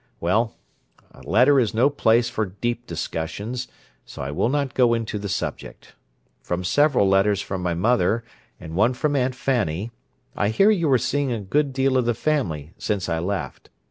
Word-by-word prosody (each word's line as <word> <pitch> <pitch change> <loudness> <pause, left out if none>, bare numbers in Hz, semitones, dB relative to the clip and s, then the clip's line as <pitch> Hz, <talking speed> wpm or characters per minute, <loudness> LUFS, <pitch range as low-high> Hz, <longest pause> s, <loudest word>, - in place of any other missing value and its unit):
Well, 110 +7 +1 0.6
a - - -16
letter 130 +6 +4
is 115 -2 0
no 130 +6 +4
place 115 -4 +3
for 110 -3 -2
deep 120 +1 -2
discussions, 100 +9 -4 0.4
so - - -8
I 70 - -4
will 75 - 0
not 140 -1 -1
go 120 -2 +3
into 110 -2 -3
the 100 0 -5
subject. 95 - -5 0.5
From 90 +1 -3
several 140 - +3
letters 95 +1 +3
from 95 -2 -4
my 90 -1 -1
mother, 115 +3 +1 0.4
and 80 - -9
one 110 +8 +2
from 145 +3 0
Aunt 130 -1 0
Fanny, 115 - -1 0.4
I 100 - +1
hear 195 - +4
you 170 -8 +1
are 130 - +6
seeing 135 +3 -1
a 115 - -2
good 140 +9 0
deal 130 0 +1
of 125 - +1
the 120 -1 +1
family 90 - -2
since 100 -2 -2
I 80 - 0
left. 90 0 -4
115 Hz, 180 wpm, -23 LUFS, 95-130 Hz, 0.6 s, are